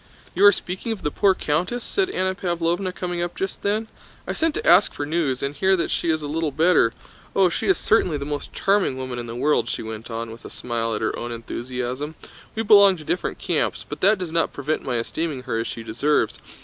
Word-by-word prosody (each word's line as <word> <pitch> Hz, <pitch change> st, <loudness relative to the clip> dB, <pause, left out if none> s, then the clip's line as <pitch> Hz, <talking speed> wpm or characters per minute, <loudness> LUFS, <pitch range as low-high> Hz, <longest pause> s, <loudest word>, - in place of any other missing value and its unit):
"You 185 Hz, -, +1 dB
are 205 Hz, -, +10 dB
speaking 185 Hz, +4 st, -4 dB
of 220 Hz, -, -5 dB
the 150 Hz, -, 0 dB
poor 195 Hz, +2 st, +3 dB
countess?" 180 Hz, +12 st, -1 dB
said 385 Hz, -2 st, 0 dB
Anna 190 Hz, -, 0 dB
Pávlovna, 175 Hz, 0 st, -1 dB
coming 175 Hz, -1 st, -3 dB
up 175 Hz, 0 st, -3 dB
just 190 Hz, -, -4 dB
then. 215 Hz, +2 st, 0 dB, 0.4 s
"I -, -, -3 dB
sent 325 Hz, -1 st, 0 dB
to -, -, -3 dB
ask 180 Hz, +4 st, +6 dB
for 145 Hz, -, -3 dB
news, 145 Hz, -5 st, -1 dB
and 140 Hz, +1 st, -1 dB
hear 190 Hz, +6 st, +2 dB
that 170 Hz, -, -1 dB
she 170 Hz, -, 0 dB
is 155 Hz, -1 st, +1 dB
a -, -, -3 dB
little 160 Hz, +1 st, -1 dB
better. 155 Hz, -4 st, +3 dB, 0.4 s
Oh, 190 Hz, -2 st, +5 dB
she -, -, -2 dB
is 385 Hz, -, +4 dB
certainly 180 Hz, -8 st, +2 dB
the 140 Hz, -, -5 dB
most 145 Hz, 0 st, -4 dB
charming 195 Hz, -9 st, +1 dB
woman 130 Hz, -2 st, -4 dB
in 120 Hz, -, -6 dB
the 115 Hz, -, -6 dB
world," 125 Hz, -2 st, +1 dB
she -, -, -3 dB
went 110 Hz, +1 st, -7 dB
on, 115 Hz, 0 st, -4 dB
with 115 Hz, -, -11 dB
a -, -, -8 dB
smile 115 Hz, -2 st, -2 dB
at 105 Hz, -, -4 dB
her 110 Hz, -, 0 dB
own 120 Hz, 0 st, -5 dB
enthusiasm. 125 Hz, +5 st, -4 dB, 0.4 s
"We 225 Hz, -, -1 dB
belong 200 Hz, -3 st, +7 dB
to 155 Hz, -, -10 dB
different 175 Hz, -, -2 dB
camps, -, -, -1 dB
but -, -, -7 dB
that 210 Hz, +3 st, +5 dB
does 180 Hz, -3 st, -5 dB
not 165 Hz, 0 st, +1 dB
prevent 150 Hz, +3 st, -2 dB
my 125 Hz, -, -3 dB
esteeming 140 Hz, +3 st, -3 dB
her 125 Hz, -4 st, -2 dB
as 115 Hz, -, -2 dB
she 115 Hz, -, -6 dB
deserves. 120 Hz, +7 st, 0 dB
155 Hz, 235 wpm, -23 LUFS, 125-185 Hz, 0.4 s, are